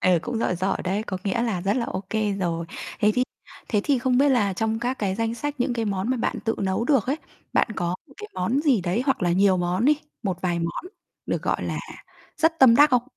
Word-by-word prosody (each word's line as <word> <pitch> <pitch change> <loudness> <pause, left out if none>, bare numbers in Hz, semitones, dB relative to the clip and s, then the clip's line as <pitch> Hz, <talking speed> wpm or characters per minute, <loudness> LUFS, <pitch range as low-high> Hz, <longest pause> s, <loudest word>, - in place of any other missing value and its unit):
Ừ, 180 -2 +4
cũng 240 -2 -3
giỏi 185 -5 0
giỏi 190 +2 0
đấy, 195 +3 0
có 195 -4 -4
nghĩa 205 +4 0
là 220 -7 -1
rất 195 +5 0
là 245 - 0
OK 190 0 -5 0.3
rồi. 170 -2 -1 0.3
Thế 210 -2 +5
thì 250 - +3 0.5
thế 210 -3 +2
thì 280 -3 +2
không 250 0 +2
biết 285 +1 +5
là 215 -7 +3
trong 220 +3 -1
các 250 +2 -2
cái 195 -3 0
danh 225 +1 -1
sách 290 +4 -3
những 245 - +1
cái 230 -1 -1
món 200 +2 -1
mà 260 - +1
bạn 230 - -1
tự 225 - +1
nấu 190 +3 0
được 265 -5 +2
ấy, 270 +3 +1 0.4
bạn - - +3
có 175 -2 -1 0.2
một 275 - -19
cái 425 0 -8
món 185 +10 0
gì 280 -8 +3
đấy 180 +7 0
hoặc 265 - +1
là 175 -1 +2
nhiều 190 +1 +4
món 180 +4 0
đi, 300 +3 +5 0.3
một 190 -5 -2
vài 175 -2 0
món 170 - -3 0.4
được - - -1
gọi - - 0
là - - -2 0.6
rất 325 +1 +2
tâm 250 -5 +7
đắc 295 +2 +7
không? 250 -2 +4
225 Hz, 250 wpm, -24 LUFS, 185-255 Hz, 0.6 s, tâm